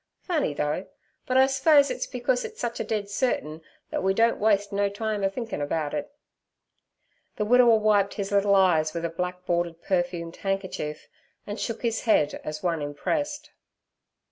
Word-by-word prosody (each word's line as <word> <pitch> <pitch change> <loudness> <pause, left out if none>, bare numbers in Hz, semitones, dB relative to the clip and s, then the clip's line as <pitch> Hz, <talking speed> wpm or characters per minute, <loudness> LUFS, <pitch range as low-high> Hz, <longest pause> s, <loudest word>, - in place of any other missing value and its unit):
Funny, 315 - 0
though, 150 +5 -2 0.4
but 255 - +2
I 265 - +7
s'pose 280 +2 +4
it's - - -3
becus - - -1
it's 450 - -7
a 240 - +1
sich - - -4
dead 210 -2 -2
certin 200 - -1 0.3
thet - - -1
we 190 0 +1
don't 230 +2 +3
waste 205 -1 +2
no 200 0 +1
time 210 0 -3
a 195 - +3
thinkin' 225 - -5
about 145 0 -2
it.' 150 - -3 1.3
The 210 - -1
widower 240 0 +6
wiped 210 -2 +2
his 200 -1 -4
little 200 0 +3
eyes 165 -5 +3
with 170 0 -2
a - - -1
black 180 +2 -4
bordered 170 -1 -1
perfumed 175 -2 -2
handkerchief, 190 -6 -3 0.4
and 205 +1 -5
shook 230 0 -4
his 230 -1 -1
head 150 -10 +2
as 155 +2 -6
one 170 -3 0
impressed. 290 - -3
200 Hz, 170 wpm, -26 LUFS, 170-230 Hz, 1.3 s, I